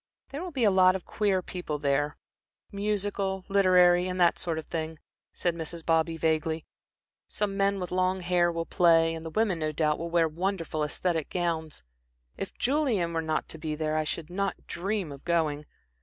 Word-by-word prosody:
"There 285 +3 -5
will 365 - -4
be 270 -7 -2
a 210 - +5
lot 185 -1 +5
of 190 - -5
queer 195 -4 0
people 175 -5 -4
there 145 +1 0 0.5
musical, 200 -2 -2
literary, 180 -2 +5
and 185 0 -3
that 175 -1 +4
sort 165 -3 -2
of 160 - -5
thing," 160 -1 -4 0.3
said 175 - -1
Mrs. 165 0 -6
Bobby, 165 0 +2
vaguely. 160 0 0 0.6
"Some 205 -2 -2
men 200 0 +2
with 180 -2 -5
long 185 +1 +1
hair 175 -1 +2
will 165 0 -3
play, 165 -3 +4
and 160 0 -6
the 165 - -5
women, 195 0 +1
no 155 -1 -1
doubt, 150 0 +1
will 170 +1 -4
wear 170 -1 +3
wonderful 170 0 -2
æsthetic 160 +1 -1
gowns. 165 - -2 0.5
If - - -6
Julian 240 - +1
were 165 - 0
not 160 -1 -1
to 160 - -8
be 155 -1 -3
there, 155 0 -1
I 155 - +1
should 160 +1 -4
not 195 +1 -2
dream 190 -1 -2
of 140 -1 -10
going. 155 -3 0
170 Hz, 185 wpm, -28 LUFS, 160-190 Hz, 0.6 s, a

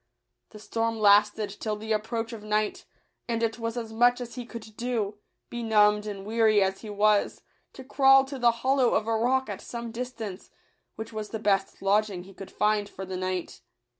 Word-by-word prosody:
The - - -12
storm 225 +1 -2
lasted 205 0 +4
till 215 -1 -2
the 220 +1 -6
approach 225 +2 -2
of 225 - -7
night, 215 0 -1 0.4
and 230 -1 -1
it 225 +1 -1
was 230 +1 -3
as 225 -2 -5
much 245 +2 +4
as 240 -1 -7
he 245 -2 -7
could 220 -3 -10
do, 220 -4 -2 0.3
benumbed 210 -3 +3
and 195 -2 -6
weary 220 -1 +3
as 190 0 -2
he 220 - -8
was, 210 0 +1 0.3
to 265 - -10
crawl 270 0 +5
to 270 0 -7
the 240 -1 +5 0.2
hollow 265 -2 +3
of 215 - +1
a 225 - 0
rock 260 +4 +1
at 205 -2 -6
some 235 -1 -6
distance, 225 -5 -6 0.5
which 220 +1 -7
was 215 -1 -5
the 220 - -4
best 195 -2 0
lodging 200 -2 +1
he 195 +1 -14
could 195 0 -10
find 210 0 0
for 190 - -8
the 185 0 -6
night. 185 -1 -4
220 Hz, 195 wpm, -27 LUFS, 205-235 Hz, 0.5 s, crawl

